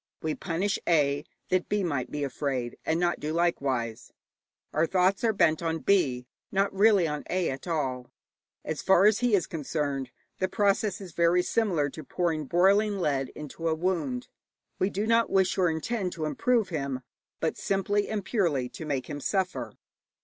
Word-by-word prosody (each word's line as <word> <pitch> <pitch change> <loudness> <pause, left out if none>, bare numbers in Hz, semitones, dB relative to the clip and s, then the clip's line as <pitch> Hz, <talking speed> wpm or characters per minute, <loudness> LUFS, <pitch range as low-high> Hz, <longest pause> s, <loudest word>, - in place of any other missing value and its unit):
We 155 -1 0
punish 190 +5 -1
A. 145 -3 +2 0.2
that 185 -1 +1
B. 205 -1 +1
may 140 -8 -1
be 150 +2 -4
afraid, 135 -3 -2
and 160 +1 +2
not 175 -1 +1
do 150 - -3
likewise. 135 -9 -1 0.6
Our 160 +2 +2
thoughts 190 +3 +2
are 230 - +4
bent 170 -6 +2
on 165 -1 -1
B., 140 -9 +2 0.3
not 195 0 +1
really 200 -3 +5
on 150 -1 -3
A. 180 -3 0
at 135 +6 -7
all. 130 -7 -2 0.6
As 155 - -3
far 190 0 +5
as 210 0 +5
he 245 -3 +3
is 185 - +1
concerned, 145 -4 -3 0.3
the 185 - +1
process 205 0 +1
is 185 -3 -8
very 170 +2 +3
similar 180 -11 +1
to 155 - -8
pouring 165 -4 -1
boiling 200 +6 +3
lead 140 -7 0
into 150 +2 -5
a 160 - +2
wound. 160 -8 -1 0.5
We 190 - +2
do 205 +2 -2
not 230 +1 +3
wish 190 -1 +2
or 180 -2 +3
intend 180 +4 -2
to 160 -2 -3
improve 225 +6 +1
him, 140 -5 -3 0.4
but - - 0
simply 200 +1 0
and 210 -3 -3
purely 155 - 0
to 160 - -8
make 140 -4 -2
him 145 -2 -5
suffer. 190 +4 -1
170 Hz, 175 wpm, -28 LUFS, 145-195 Hz, 0.6 s, really